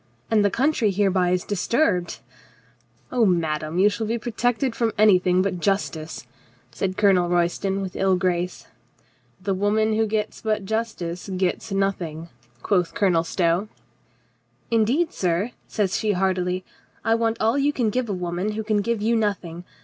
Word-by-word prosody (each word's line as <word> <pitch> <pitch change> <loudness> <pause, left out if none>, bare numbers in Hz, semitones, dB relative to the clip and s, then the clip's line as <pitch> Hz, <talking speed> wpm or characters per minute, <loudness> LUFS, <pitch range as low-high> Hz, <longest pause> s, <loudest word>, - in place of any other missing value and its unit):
" 120 - -38
— - - -33
and 215 -2 +4
the 205 - +4
country 265 0 +1
hereby 190 -2 +2
is 180 0 +1
disturbed 205 - 0 0.3
— 120 +1 -33
" 120 0 -36
"Oh, 245 -2 +2
madame, 160 -4 0
you 195 +3 +5
shall 215 +1 -1
be 230 +2 0
protected 240 +2 -1
from 230 -2 +1
any 210 -3 +6
thing 180 0 +2
but 190 -2 -2
justice," 165 -7 -2 0.5
said 185 +10 -3
Colonel 185 -4 +4
Royston 175 +3 0
with 185 - -6
ill 190 -1 +2
grace. 180 -1 -1 0.7
"The 195 +1 -1
woman 210 +3 +1
who 220 0 +1
gets 215 0 -2
but 215 -2 -1
justice 200 -5 -3
gets 185 +3 -1
nothing," 175 -5 -2 0.3
quoth 180 -5 +1
Colonel 180 -5 +2
Stow. 170 +3 0 1.0
"Indeed, 240 +10 +2
sir," 180 +5 0 0.2
says 200 -4 -1
she 215 -1 0
heartily, 185 -1 0 0.4
"I 225 - +3
want 230 0 +1
all 225 +5 +2
you 285 +1 +2
can 240 -6 0
give 250 0 -1
a - - 0
woman 180 +3 -2
who 220 +1 -3
can 215 0 +1
give 230 0 -1
you 230 +2 +2
nothing. 180 -6 -2
195 Hz, 170 wpm, -23 LUFS, 180-220 Hz, 1.0 s, any